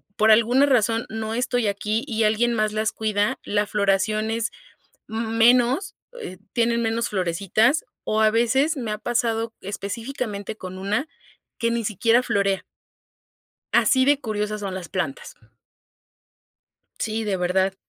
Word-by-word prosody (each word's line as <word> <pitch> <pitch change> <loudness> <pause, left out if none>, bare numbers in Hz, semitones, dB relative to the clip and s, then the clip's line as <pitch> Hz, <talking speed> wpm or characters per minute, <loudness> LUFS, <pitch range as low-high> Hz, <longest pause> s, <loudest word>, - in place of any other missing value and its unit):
por 220 +1 +4
alguna 240 +5 +5
razón, 230 -3 +2
no 220 0 -4
estoy 245 -2 0
aquí 210 +5 -1
y 225 -3 0
alguien 225 +3 +2
más 215 -1 +1
las 215 +1 -1
cuida, 210 -1 0
la 205 0 0
floración 210 +2 +1
es 230 0 -1 0.6
m 225 +1 -3
menos, 250 - +4 0.3
eh, 185 - -7 0.2
tienen 235 0 +1
menos 225 +1 0
florecitas 200 - +1 0.2
o 220 0 0
a 215 - +5
veces, 265 +7 +2
me 235 -4 -3
ha 210 - -2
pasado, 230 -1 -1
específicamente 205 +2 -5
con 185 -2 -8
una, 210 +9 -1 0.5
que 230 0 0
ni 235 -1 -1
siquiera 230 +4 +2
florea. 200 -4 0 1.1
Así 260 -1 +4
de 290 0 +3
curiosas 210 -2 -3
son 195 -2 -4
las 180 -3 -6
plantas. 270 - -4 1.6
Sí, 220 0 -2
de 200 -2 0
verdad. 190 +2 +1
220 Hz, 140 wpm, -23 LUFS, 205-235 Hz, 1.6 s, alguna